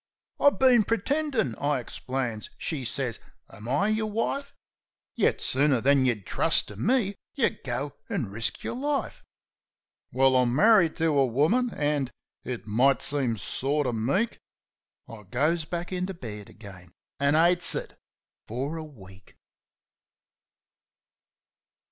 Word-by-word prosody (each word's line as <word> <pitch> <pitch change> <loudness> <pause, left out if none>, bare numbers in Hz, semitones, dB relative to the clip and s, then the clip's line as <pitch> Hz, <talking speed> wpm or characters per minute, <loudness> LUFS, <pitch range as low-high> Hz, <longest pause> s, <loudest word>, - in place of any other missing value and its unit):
"I 285 - +7
been 255 -5 +4
pretendin'," 230 - 0
I 145 -1 0
ixplains. 125 -4 -4
She 150 -5 -3
sez, 125 -1 -2 0.3
u - - -11
Am 105 +2 -10
I 190 +11 +2
yer 215 0 0
wife? 230 +6 -2 0.6
Yet - - +1
sooner 135 -1 +3
than 135 +2 +3
yeh'd 110 -6 -1
trust - - +2
to 105 - -9
me 205 - +1 0.2
yeh 270 - +3
go 130 +2 -3 0.2
an' 100 - -2
risk 110 +2 -1
yer - - -3
life," 285 +3 -2 0.9
Well, 130 0 +3
I'm 125 -1 +2
marri'd 200 -2 +5
to 160 -2 +1
a 135 - +5
woman, 160 - +2
an' 145 -3 0 0.3
it 125 -4 -5
might 125 +6 +2
seem 130 -6 +1
sort 140 +9 0
uv 125 - -1
meek 160 - 0 0.7
I 115 -2 -10
goes 155 - 0
back 175 +2 -5
into 185 +1 -3
bed 105 -9 -8
again... 95 -5 -13 0.3
an' 140 +1 +3
'cites 175 +2 +3
it... - - -6 0.5
fer 135 +8 -4
a 160 - -5
week! 95 -10 -15
140 Hz, 135 wpm, -27 LUFS, 120-185 Hz, 0.9 s, I